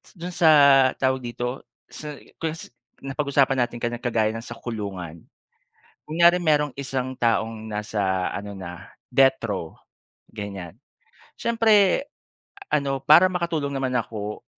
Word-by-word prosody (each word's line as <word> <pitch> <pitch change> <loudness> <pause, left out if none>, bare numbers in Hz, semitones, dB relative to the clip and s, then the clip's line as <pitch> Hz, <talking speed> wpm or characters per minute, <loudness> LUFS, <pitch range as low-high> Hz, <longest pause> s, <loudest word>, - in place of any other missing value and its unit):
s - - -20
dun 175 +1 -6
sa 165 -2 +4 0.5
tawag 130 0 0
dito, 125 +1 -4 0.2
sa 150 -1 -8 0.2
kung 160 -1 -2
sa 120 - -11 0.3
napag-usapan 135 -1 +1
natin 120 - -8
kanina 120 0 -3
kagaya 110 -3 0
ng 115 - -5
sa 120 - -8
kulungan. 95 -9 -6 0.8
Kunyari 170 +3 +3
merong 150 -4 +2
isang 130 -2 -3
taong 115 -2 -1
nasa 100 -3 -1
ano 100 0 -6
na, 90 -1 -9 0.2
death-row, 125 - +1 0.6
ganyan. 100 -5 -7 0.7
Siyempre 225 -2 +3 0.7
ano, 135 -2 0
para 155 +6 +7
makatulong 165 -5 -2
naman 135 -2 -2
ako, 105 -2 -5
125 Hz, 125 wpm, -24 LUFS, 105-150 Hz, 0.8 s, para